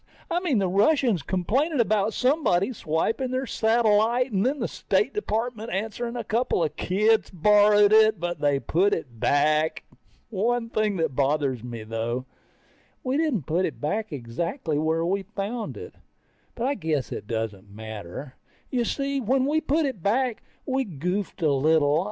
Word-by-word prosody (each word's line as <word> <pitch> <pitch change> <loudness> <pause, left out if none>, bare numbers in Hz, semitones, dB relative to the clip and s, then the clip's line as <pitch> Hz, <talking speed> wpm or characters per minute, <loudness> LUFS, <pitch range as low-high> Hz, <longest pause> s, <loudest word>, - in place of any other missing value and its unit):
I 345 - +2
mean, 340 -9 0
the 195 -2 +1
Russians 210 - +2
complaining 245 - 0
about 215 -2 +1
somebody 255 - +2
swiping 225 +9 -1
their 255 +1 -1
satellite 230 +2 +2
and 195 -1 +1
then 270 +5 +1
the - - -1
State - - 0
Department 230 - -3
answering 225 +4 -3
a 240 - -3
couple 225 -4 0
of 155 - -2
kids 215 +4 +2
borrowed 205 +3 +5
it, 220 -2 +5
but 175 -2 -3
they 145 -2 +2
put 190 +8 +1
it 125 -8 -8
back. 155 +4 +2 0.5
One 230 +3 -1
thing 215 -2 0
that 160 -5 -1
bothers 140 -3 0
me 120 -2 -6
though, 115 +3 -3 0.8
we 255 +1 -1
didn't 300 - 0
put 170 +5 0
it - - -5
back 210 +8 -2
exactly 155 - -3
the - - 0
way 160 +1 +1
we 190 +4 0
found 210 +3 -5
it. 445 +1 -9 0.6
But 235 - -2
I 275 - +1
guess 155 - -2
it - - -6
doesn't 110 -3 -4
matter. 110 +4 -8 0.4
You 245 -2 0
see, 275 +2 -1
when 260 +3 +1
we 305 +3 +1
put 310 +2 +1
it 260 -10 -4
back, 235 +5 0 0.2
we 265 0 0
goofed 180 - -4
a 155 - +4
little. 150 +1 +3
205 Hz, 165 wpm, -25 LUFS, 155-240 Hz, 0.8 s, borrowed